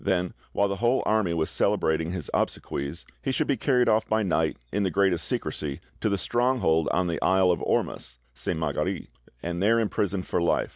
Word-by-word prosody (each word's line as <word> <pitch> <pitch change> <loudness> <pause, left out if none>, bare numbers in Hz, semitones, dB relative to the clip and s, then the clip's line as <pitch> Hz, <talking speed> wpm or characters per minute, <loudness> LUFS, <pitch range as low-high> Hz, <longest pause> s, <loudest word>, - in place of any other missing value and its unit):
Then, 90 -2 0 0.2
while 100 - +2
the 100 0 -3
whole 120 +5 +2
army 110 -5 +2
was 80 -2 0
celebrating 80 +1 +1
his 90 -5 -4
obsequies, 70 +6 -2 0.2
he 135 - -1
should - - +1
be 140 - +1
carried 125 0 +2
off 110 0 +3
by 110 0 +1
night, 95 - +1
in 105 - 0
the 95 - +1
greatest 95 -2 +1
secrecy, 75 -1 -3 0.2
to 110 - +1
the 100 - +1
stronghold 120 -9 +1
on 90 - +1
the 85 -1 -2
isle 95 -1 +4
of 85 - -1
Ormus - - -1 0.2
(Sainte 65 +5 -3
Marguerite), 80 -5 -2 0.3
and 85 +1 -3
there 115 +3 +4
imprisoned 100 -4 -1
for - - 0
life. 85 - +1
95 Hz, 195 wpm, -26 LUFS, 85-110 Hz, 0.3 s, isle